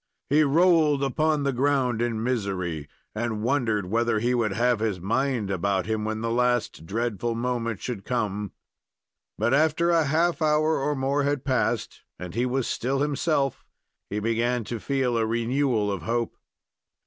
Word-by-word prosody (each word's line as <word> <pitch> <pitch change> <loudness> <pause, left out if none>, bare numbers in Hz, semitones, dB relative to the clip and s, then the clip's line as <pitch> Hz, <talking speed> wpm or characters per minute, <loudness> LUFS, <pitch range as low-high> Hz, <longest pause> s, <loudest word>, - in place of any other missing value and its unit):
He 150 +2 +5
rolled 155 -1 +4
upon 150 +2 +1
the 140 -1 0
ground 130 -3 +1
in 115 -2 -1
misery, 95 - -2 0.2
and 110 -1 -2
wondered 115 -6 +1
whether 115 +3 +1
he 120 +3 +1
would 115 -4 +1
have 120 +1 +2
his 110 -4 -1
mind 115 +2 0
about 95 0 0
him 110 0 -2
when 110 0 -2
the 115 0 -1
last 120 -8 0
dreadful 115 +2 -2
moment 115 -2 -2
should 115 -6 -4
come; 105 -5 -2 0.9
but 120 - +1
after 160 +3 +3
a 165 -2 +3
half 165 +4 +1
hour 155 0 +2
or 145 +2 0
more 135 +2 0
had 145 -1 -1
passed, 130 -2 -1 0.2
and 90 -1 -7
he 120 +4 0
was 130 0 0
still 135 +3 -1
himself, 145 -1 0 0.5
he 105 - -3
began 115 +3 0
to 115 +2 -5
feel 130 -2 0
a - - +2
renewal 115 -1 +1
of 95 -4 -3
hope. 115 +6 -2
120 Hz, 160 wpm, -25 LUFS, 110-140 Hz, 0.9 s, He